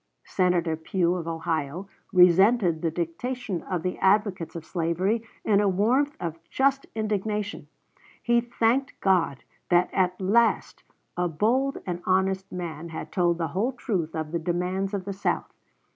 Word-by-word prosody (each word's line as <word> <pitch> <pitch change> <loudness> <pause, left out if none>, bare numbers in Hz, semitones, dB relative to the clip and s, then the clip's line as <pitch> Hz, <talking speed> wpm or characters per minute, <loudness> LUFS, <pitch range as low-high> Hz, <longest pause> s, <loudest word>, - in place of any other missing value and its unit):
Senator 180 -3 +1
Pugh, 170 +2 0
of 175 -2 -4
Ohio, 165 +1 -2 0.2
resented 180 -1 +5
the 165 - +1
dictation 180 +5 -3
of 180 -4 -3
the 180 - -3
advocates 190 -4 +1
of 165 -1 -6
slavery 180 +6 0 0.2
in 205 -2 +4
a 205 - +3
warmth 250 +10 +1
of 165 -1 -4
just 275 0 +1
indignation. 210 -1 -2 0.5
He 235 0 +2
thanked 240 +3 0
God 180 -8 +1 0.3
that 175 0 +3
at 185 -1 +1
last 225 +5 +2 0.3
a 175 0 0
bold 240 - +1
and 175 -1 -3
honest 190 +1 +1
man 170 -2 -5
had 160 - -7
told 175 -2 +2
the 165 -2 -2
whole 210 - -1
truth 180 -10 -2
of 155 -1 -3
the 170 - -1
demands 180 +4 -1
of 190 -2 -4
the 200 - -3
South. 195 - -2
185 Hz, 150 wpm, -26 LUFS, 170-210 Hz, 0.5 s, resented